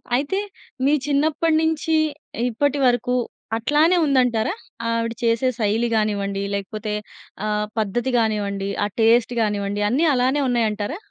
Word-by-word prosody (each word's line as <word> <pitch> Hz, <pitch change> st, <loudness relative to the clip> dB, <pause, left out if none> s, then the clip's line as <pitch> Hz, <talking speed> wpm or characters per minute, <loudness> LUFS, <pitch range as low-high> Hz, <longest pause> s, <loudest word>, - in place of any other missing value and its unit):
అయితే, 285 Hz, +9 st, 0 dB, 0.5 s
మీ 285 Hz, -, +4 dB
చిన్నప్పటి 305 Hz, +3 st, +1 dB
నుంచి 320 Hz, 0 st, 0 dB, 0.5 s
ఇప్పటి 285 Hz, +4 st, 0 dB
వరకు 245 Hz, +1 st, +1 dB, 0.4 s
అట్లానే 300 Hz, +9 st, +3 dB
ఉందంటారా? 250 Hz, -6 st, +2 dB, 0.4 s
ఆవిడ 230 Hz, 0 st, -1 dB
చేసే 230 Hz, +2 st, +2 dB
శైలి 220 Hz, +2 st, +1 dB
గానివ్వండి. 200 Hz, -2 st, -1 dB
లేకపోతే 210 Hz, +2 st, -4 dB, 0.5 s
ఆహ్, 210 Hz, 0 st, 0 dB
పద్ధతి 225 Hz, +5 st, -1 dB
గానివ్వండి. 200 Hz, -3 st, -1 dB, 0.2 s
ఆ -, -, 0 dB
టేస్ట్ 230 Hz, +2 st, +4 dB
గానివ్వండి 205 Hz, -1 st, -1 dB
అన్ని 280 Hz, +9 st, +2 dB
అలానే 260 Hz, +3 st, +2 dB
ఉన్నాయంటారా? 220 Hz, +2 st, -1 dB
230 Hz, 120 wpm, -22 LUFS, 210-280 Hz, 0.5 s, మీ